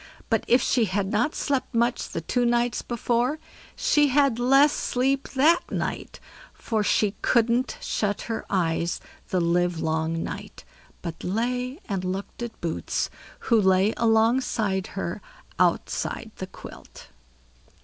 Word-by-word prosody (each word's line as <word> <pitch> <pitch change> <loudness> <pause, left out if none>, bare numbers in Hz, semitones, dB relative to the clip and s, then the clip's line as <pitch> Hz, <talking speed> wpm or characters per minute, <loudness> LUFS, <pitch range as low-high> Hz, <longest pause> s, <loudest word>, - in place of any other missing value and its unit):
But 225 - +2
if 245 +1 +4
she 240 -3 +2
hadn't 210 - 0
slept 270 -4 -1
much 235 +2 +1
the 165 - -4
two 245 +9 0
nights 240 0 +1
before, 240 +4 0 0.4
she 295 -1 +3
had 275 -3 +3
less 275 +4 +5
sleep 270 +2 0
that 315 +6 +4
night; - - -4 0.4
for 220 -2 -1
she 205 0 +2
couldn't 235 +2 +2
shut 205 -1 -1
her 225 -1 -4
eyes 170 -3 0 0.3
the 185 - +1
livelong 165 -2 0
night, - - -7 0.4
but 165 -1 -6
lay 250 - -2
and 195 -3 -2
looked 190 +5 -4
at 235 -1 -6
Boots, 165 -2 -2 0.3
who 230 -3 +3
lay 190 +2 +3
alongside 225 -4 +2
her - - -3 0.4
outside 220 - 0
the 185 - -5
quilt. - - -12
225 Hz, 130 wpm, -25 LUFS, 190-250 Hz, 0.4 s, less